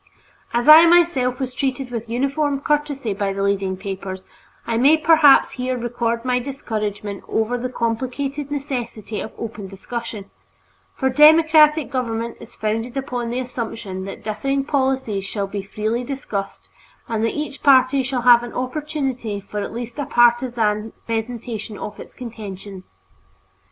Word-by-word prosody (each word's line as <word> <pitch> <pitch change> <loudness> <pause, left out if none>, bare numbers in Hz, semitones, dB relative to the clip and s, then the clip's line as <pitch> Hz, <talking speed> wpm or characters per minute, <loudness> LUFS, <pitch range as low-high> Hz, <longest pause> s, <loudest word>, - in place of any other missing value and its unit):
As 240 +3 0
I 315 +2 +10
myself 330 -8 +3
was 260 -2 -3
treated 265 -1 -2
with 230 -1 -5
uniform 275 +4 0
courtesy 290 -6 -1
by 195 0 -2
the 195 0 -2
leading 195 -1 0
papers, 190 -1 -6 0.4
I 230 - -1
may 280 +6 +5
perhaps 315 -3 +6
here 255 0 -2
record 235 0 -2
my 250 0 +2
discouragement 215 -6 -4
over 220 +2 0
this 250 +1 -3
complicated 265 +5 -2
difficulty 250 -7 -4
of 220 - -6
open 220 -3 -6
discussion, 205 +1 -7 0.6
for 265 -1 0
democratic 310 +1 +6
government 235 -3 -2
is - - -13
founded 225 +4 -2
upon 250 -3 -3
the 240 - -3
assumption 225 -6 -5
that 195 - -8
differing 275 +6 -1
policies 265 -8 0
shall 200 +1 -3
be 200 +1 -5
freely 215 +4 -2
discussed 235 -7 -5 0.4
and 225 -1 -1
that 230 - -1
each 300 -2 -4
party 270 -1 +5
shall 255 -2 -2
have 240 -1 +7
an 240 -1 -7
opportunity 255 -5 -3
for 205 +1 -6
at 205 - -4
least 240 +3 -6
a 285 - -2
partisan 235 -3 +2
presentation 225 -2 -4
of 210 - -7
its - - -11
contentions. 200 -5 -9
240 Hz, 145 wpm, -21 LUFS, 215-270 Hz, 0.6 s, I